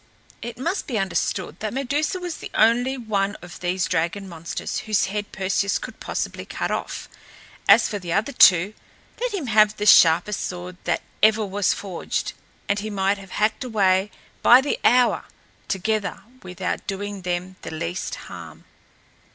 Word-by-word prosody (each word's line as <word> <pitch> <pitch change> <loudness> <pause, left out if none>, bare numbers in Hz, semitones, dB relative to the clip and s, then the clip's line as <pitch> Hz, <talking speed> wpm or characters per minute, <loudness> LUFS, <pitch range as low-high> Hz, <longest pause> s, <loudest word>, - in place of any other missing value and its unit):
It 235 - -6
must 340 +10 -2
be 240 - -2
understood 190 -3 -2
that 215 +2 -4
Medusa 290 +7 -1
was 355 -3 -5
the - - -8
only 245 +4 +3
one 205 -4 -1
of 175 - -10
these 180 +1 0
dragon 175 +5 -1
monsters 165 -2 -5
whose 215 -2 +1
head 205 +1 -4
Perseus 195 +1 0
could - - -9
possibly - - -4
cut - - -4
off. - - -4 0.6
As - - +7
for 205 - -4
the 175 -3 -6
other 215 +9 +1
two, 190 -5 +6 0.5
let - - 0
him 370 -8 -3
have 215 -2 +4
the 210 - -2
sharpest 175 +1 +6
sword 180 0 -6
that - - 0 0.2
ever 215 0 +4
was 200 0 +1
forged, 190 -4 -4 0.3
and 200 +1 +1
he 215 +2 -4
might 200 0 0
have 195 -1 -12
hacked 215 +4 0
away 200 -4 +2 0.3
by 245 - +8
the 275 +2 -1
hour 250 0 +4 0.4
together 210 +2 -1 0.2
without 180 0 -4
doing 205 0 -4
them 180 +1 -3
the - - -7
least 170 +3 -4
harm. - - -10
205 Hz, 160 wpm, -23 LUFS, 185-220 Hz, 0.6 s, by